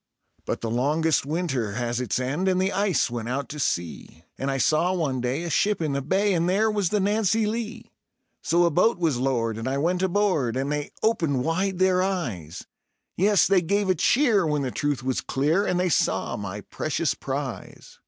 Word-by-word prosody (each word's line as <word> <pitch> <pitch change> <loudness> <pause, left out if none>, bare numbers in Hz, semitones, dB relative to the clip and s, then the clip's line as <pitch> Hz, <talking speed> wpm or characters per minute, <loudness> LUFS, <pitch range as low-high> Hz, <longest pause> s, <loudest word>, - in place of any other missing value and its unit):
But - - -2
the 115 - -3
longest 150 +5 +1
winter 140 - -2
has 120 +2 -2
its 120 -3 -1
end, 140 +9 -1
and 185 -1 +2
the 190 +1 +1
ice 195 - +1
went 120 -1 -4
out 135 +1 -2
to 150 - -7
sea, 85 - -3
And 135 - -3
I 135 - -1
saw 155 +7 +2
one 145 -8 -1
day 130 +6 -2
a 170 - -4
ship 210 +5 +1
in 155 -3 -1
the 140 0 -1
bay, 195 +8 +1
and 170 0 +1
there 215 +4 +2
was 205 -4 0
the 210 - +1
Nancy 210 +2 +1
Lee. 230 +1 -4 0.5
So 170 +1 +2
a 170 - +2
boat 185 +8 +3
was 165 -7 0
lowered 115 -4 -1
and 115 - -4
I 135 +1 -1
went 175 +5 0
aboard, 185 - +1
and 135 +2 -1
they 150 0 -2
opened 165 - +1
wide 185 +4 -1
their 185 0 +3
eyes 120 - -3 0.5
Yes, 200 +2 +4
they 195 -2 +3
gave 200 +3 +1
a - - +4
cheer 225 - +3
when 150 -2 0
the 130 - -2
truth 145 -3 -2
was 130 -1 -1
clear, 155 +9 0
and 180 -1 0
they 180 - +1
saw - - 0
my 100 0 -6
precious - - -2
prize. - - -6
165 Hz, 205 wpm, -25 LUFS, 130-190 Hz, 0.5 s, Yes